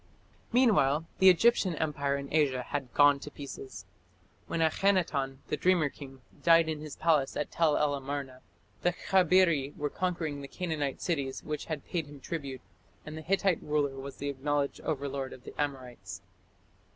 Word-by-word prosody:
Meanwhile 185 - +3
the 190 - +8
Egyptian 185 -1 +4
empire 145 -2 -1
in 140 0 -7
Asia 135 -5 +2
had 135 -2 -4
gone 145 -1 +5
to 145 - -8
pieces. 130 -9 -9 0.6
When 165 - -2
Akhenaton, 160 -6 +1
the 150 - 0
dreamer 175 -2 +3
king, 135 -2 -12 0.2
died 165 -1 +5
in 155 -2 -3
his 155 -2 -7
palace 150 -5 +1
at 150 - -2
Tell 160 -3 +2
el 150 -1 +2
Amarna, 135 -2 -5 0.4
the 175 - +2
Khabiri 180 -6 +3
were 145 0 -2
conquering 165 -6 -2
the 140 - -7
Canaanite 155 -5 -3
cities 140 -7 -2
which 150 -1 -4
had 155 -3 -5
paid 165 -4 -3
him 145 -1 -12
tribute, 135 -2 -5 0.4
and 155 - -7
the 160 - -6
Hittite 190 +2 +1
ruler 145 -2 0
was 135 +1 -8
the 145 - -3
acknowledged 140 +1 -1
overlord 140 -3 -3
of 125 - -13
the - - -10
Amorites. 130 -4 -5
145 Hz, 165 wpm, -30 LUFS, 140-165 Hz, 0.6 s, the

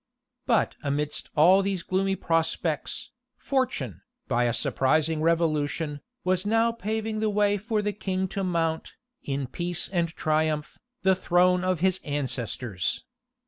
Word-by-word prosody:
But - - +2
amidst 145 +1 -2
all 180 +6 +6
these 195 -3 -2
gloomy 195 +2 0
prospects, 165 -2 -1 0.3
fortune, 190 - -1 0.3
by 120 -1 +2
a 120 - +2
surprising 155 +7 +1
revolution, 155 -2 0 0.2
was 185 0 +1
now 225 +2 +3
paving 220 -1 -3
the 215 0 +1
way 205 0 +2
for 215 0 -1
the 210 0 -1
king 190 -2 -2
to 195 +1 -3
mount, 165 -3 -1 0.3
in 140 -1 -2
peace 175 +6 -2
and 175 -3 +1
triumph, 155 -2 -1 0.2
the 190 0 +5
throne 180 0 +3
of 185 -3 0
his 185 0 +2
ancestors. 125 - -2
170 Hz, 135 wpm, -27 LUFS, 150-195 Hz, 0.3 s, all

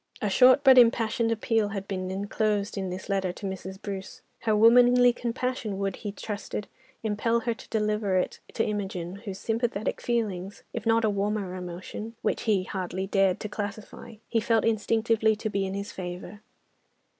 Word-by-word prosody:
A 210 - -1
short 255 +5 +6
but 265 -2 +8
impassioned 230 -1 +3
appeal 225 -1 +1
had 200 -1 -5
been 185 -1 -3
enclosed 205 +1 -1
in 190 -2 -3
this 185 +1 -6
letter 195 -2 0
to 200 - -8
Mrs. 190 0 -5
Bruce. 195 -2 -7 0.2
Her 220 -2 +1
womanly 245 +2 +6
compassion 240 -3 -3
would, 195 -1 -2
he 205 - -5
trusted, 210 0 -5 0.4
impel 225 +2 +1
her 235 0 0
to 230 - -14
deliver 210 -3 +1
it 180 - -1 0.2
to 225 - +1
Imogen, 195 -3 -3
whose 200 -2 -7
sympathetic 225 0 -2
feelings, 205 -5 -2
if 230 -1 -4
not 225 0 +4
a - - +3
warmer 200 -1 -1
emotion, 185 +5 -7
which - - 0
he 195 -3 +3
hardly 185 0 -3
dared 195 -2 +2
to - - -3
classify, 210 +2 -6
he 230 - +1
felt 225 0 +2
instinctively 225 0 +2
to 215 0 -4
be 195 -1 0
in 190 - -4
his 200 +1 -4
favour. 180 +2 -7
210 Hz, 170 wpm, -27 LUFS, 195-225 Hz, 0.4 s, but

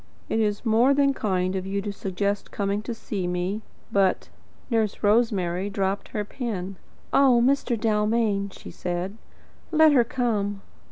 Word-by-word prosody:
"It 225 - +1
is 210 +1 0
more 235 +5 +4
than 280 -1 +3
kind 185 -6 -1
of 190 0 -3
you 200 +1 -1
to 205 -1 -3
suggest 200 +1 -2
coming 200 0 -1
to 235 - -4
see 195 -5 -4
me, 180 +4 -2 0.3
but 195 -2 +2 0.2
" - - -31
Nurse 220 -3 0
Rosemary 205 -4 +2
dropped 195 0 -1
her 210 -1 -3
pen. 195 -6 -4 0.4
"Oh, 265 -3 +5
Mr. 260 -3 +1
Dalmain," 210 -2 +1
she - - -11
said, 180 +4 -4 0.5
"let 315 -1 +6
her 260 -4 +5
come." 210 -5 -1
205 Hz, 155 wpm, -25 LUFS, 195-230 Hz, 0.5 s, let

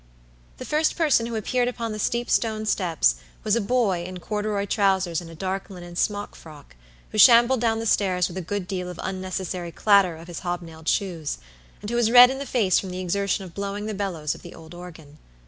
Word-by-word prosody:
The - - -8
first 310 +1 +1
person 295 -9 +2
who 235 - -5
appeared 245 +3 0
upon 235 -2 -3
the 215 - -5
steep 235 +3 -1
stone 220 -2 0
steps 165 - +1 0.3
was 215 0 +2
a 235 - +1
boy 200 -6 +1
in 185 +1 -7
corduroy 210 +1 -2
trousers 190 -5 +1
and 170 - -11
a 165 - -11
dark 190 +3 -4
linen 175 -2 -10
smock 205 +3 -1
frock, 150 - -14 0.4
who 215 - -2
shambled 240 +1 +7
down 225 -2 +1
the 225 - -4
stairs 185 -4 +2
with 175 - -10
a 190 - -3
good 185 +1 -4
deal 180 -1 -4
of 180 - -9
unnecessary 185 -2 -4
clatter 195 -4 +3
of 165 +1 -12
his 175 -2 -6
hobnailed 170 -3 -6
shoes, 170 -7 -1 0.4
and 210 - -6
who - - -1
was 240 -2 +2
red 245 +1 +9
in 270 - -5
the 280 - -5
face 210 -8 +2
from 190 - -6
the 180 0 -5
exertion 195 +2 -1
of 180 -3 -11
blowing 200 +2 -4
the 215 - -3
bellows 180 -7 -2
of - - -12
the 175 - -11
old 160 0 -13
organ. 160 -4 -12
195 Hz, 215 wpm, -24 LUFS, 175-220 Hz, 0.4 s, red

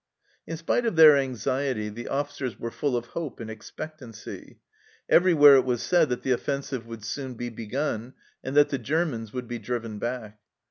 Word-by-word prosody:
In 165 - -4
spite 200 +9 0
of 225 - -1
their 155 -2 +9
anxiety, 130 -3 -1
the 110 +3 -7
officers 140 -3 -3
were 115 - -4
full 135 -1 -1
of 120 - -4
hope 160 -6 -5
and 110 -1 -6
expectancy; 120 0 -9 0.5
everywhere 150 -6 +7
it 130 - +4
was 125 -2 -1
said 170 -5 +3
that 125 - -2
the 130 - 0
offensive 135 -1 -2
would 115 -2 -8
soon 130 +2 -5
be 120 +1 -4
begun, 120 +1 -4 0.3
and 135 +2 -3
that 145 - +6
the 140 - -2
Germans 125 -4 -1
would 125 0 -5
be 120 0 -5
driven 115 -1 -4
back. 110 -2 -5
130 Hz, 180 wpm, -26 LUFS, 115-145 Hz, 0.5 s, their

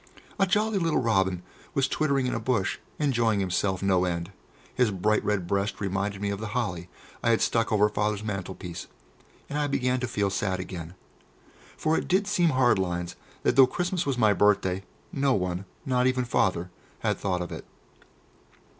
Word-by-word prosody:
A 195 - +4
jolly 210 +1 +2
little 165 -3 +1
robin 95 -6 +1 0.3
was 135 -1 +3
twittering 140 -3 +1
in 125 - -1
a - - -1
bush, 115 -8 0 0.2
enjoying 115 -8 +2
himself 95 0 0
no 95 -2 +3
end; 85 0 -2 0.4
his 125 -3 +3
bright 105 +2 +1
red 100 -4 0
breast 100 +3 -1
reminded 100 0 -2
me 100 - 0
of 100 - -3
the 110 +1 -4
holly 90 -7 -2 0.3
I - - +1
had 115 - +4
stuck 115 0 +1
over 105 -1 +4
Father's 105 0 -1
mantelpiece, 95 -4 -5 0.6
and 145 - -3
I 145 - +1
began 130 -2 +1
to 125 - -2
feel 100 -4 0
sad 95 0 -1
again. 90 -2 -7 0.8
For 155 +1 +1
it - - -1
did 190 +3 +2
seem 185 -5 +2
hard 130 -7 +3
lines 90 -1 -2 0.3
that - - +2
though 135 -1 +8
Christmas 175 +3 -2
was 135 -3 0
my 110 -4 +4
birthday, 95 -2 +2 0.3
no 140 -2 +2
one, 90 0 -2 0.2
not 125 -1 +2
even 130 -1 +1
Father, 90 -6 0 0.3
had - - 0
thought 90 -2 -1
of 85 - -8
it. - - -7
105 Hz, 180 wpm, -27 LUFS, 95-130 Hz, 0.8 s, though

